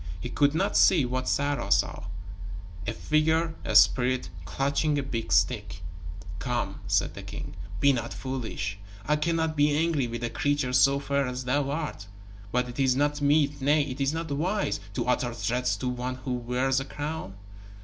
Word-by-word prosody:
He - - -5
could 145 +1 +2
not - - 0
see 165 -8 +5
what 130 +1 -2
Sarah 140 -8 0
saw 100 0 +1 0.8
a - - +1
figure, 160 +4 +1
a - - -2
spirit, 125 -7 +4
clutching 140 - 0
a 140 - 0
big 115 -9 -4
stick. 90 -2 +1 0.6
"Come," 120 -3 -2
said - - +1
the - - -8
king, - - -7 0.3
"be 140 0 +5
not 115 -2 -3
foolish. 110 -7 -4 0.3
I 150 - +2
cannot 160 +1 0
be 145 0 +3
angry 160 -5 +1
with 120 0 -5
a 120 - -2
creature 145 -3 0
so 135 +2 +5
fair 140 -1 0
as 125 0 -4
thou 140 +2 +1
art. 145 -9 -4 0.4
But 125 0 +1
it 125 +2 -8
is 130 -2 +3
not 145 +1 +1
meet 145 0 +2
nay, 145 +2 +3
it 135 -1 -5
is 135 +1 +2
not 160 -1 -4
wise 180 +9 0 0.2
to - - -1
utter 125 -1 0
threats 125 -2 0
to 125 - -3
one 125 +1 -3
who 130 0 -4
wears 125 +2 0
a 135 - -4
crown." 145 -8 -5
135 Hz, 180 wpm, -27 LUFS, 125-145 Hz, 0.8 s, see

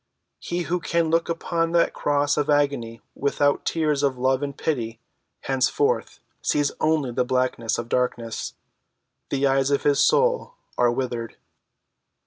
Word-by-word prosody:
He 175 0 -3
who 180 +1 -1
can 170 -1 0
look 165 +1 +1
upon 165 0 -1
that 170 - +3
cross 145 0 +1
of 150 0 -1
agony 140 -6 +1
without 145 0 +1
tears 150 -3 +1
of 135 -3 +1
love 130 +1 +1
and 140 -1 -4
pity, 115 -7 -2 0.4
henceforth 280 - 0 0.2
sees 145 -1 +1
only 155 -5 +1
the 120 - +1
blackness 125 -2 0
of 120 - -4
darkness. 120 -2 -2 0.7
The 140 0 0
eyes 135 0 +2
of 140 - +1
his 145 -1 +3
soul - - +2 0.2
are 120 -1 +3
withered. 120 -2 -3
140 Hz, 140 wpm, -24 LUFS, 125-160 Hz, 0.7 s, that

